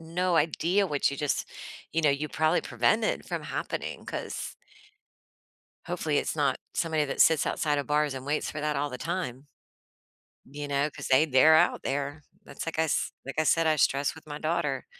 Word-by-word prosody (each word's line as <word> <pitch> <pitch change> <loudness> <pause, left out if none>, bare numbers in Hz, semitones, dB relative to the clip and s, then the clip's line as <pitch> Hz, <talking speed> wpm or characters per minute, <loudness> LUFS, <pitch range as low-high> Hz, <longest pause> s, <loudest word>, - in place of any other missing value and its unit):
no 170 +2 0
idea 170 +5 +2
what 145 -4 +1
you 140 - -5
just 145 0 -1 0.5
you 165 - +1
know, 155 - +3
you 145 +2 -1
probably 160 +2 +1
prevented 220 0 +1
from - - -3
happening, - - -4
'cause - - -5 1.3
Hopefully, - - 0
it's - - -2
not - - +2 0.2
somebody 160 -2 +1
that 140 - -4
sits 160 -3 +5
outside 150 -2 0
of 140 - -3
bars 150 -1 +1
and 130 +1 -7
waits 150 +1 -1
for 155 - -5
that 150 -1 -1
all 145 +1 -1
the 125 - -6
time 150 -6 -4 1.0
You 145 +1 -6
know, 140 +1 +1
'cause - - -7
they 135 +4 +5
they're 155 +2 +6
out 175 - +3
there. 145 +2 -3 0.2
That's - - -8
like 165 - -4
I - - +4
s 155 - 0
like 135 - -6
I - - +4
said, 165 +1 +3
I 155 - +4
stress 140 0 +2
with 160 -1 -15
my 145 0 -5
daughter. 155 -4 -1
150 Hz, 190 wpm, -28 LUFS, 140-160 Hz, 1.3 s, they're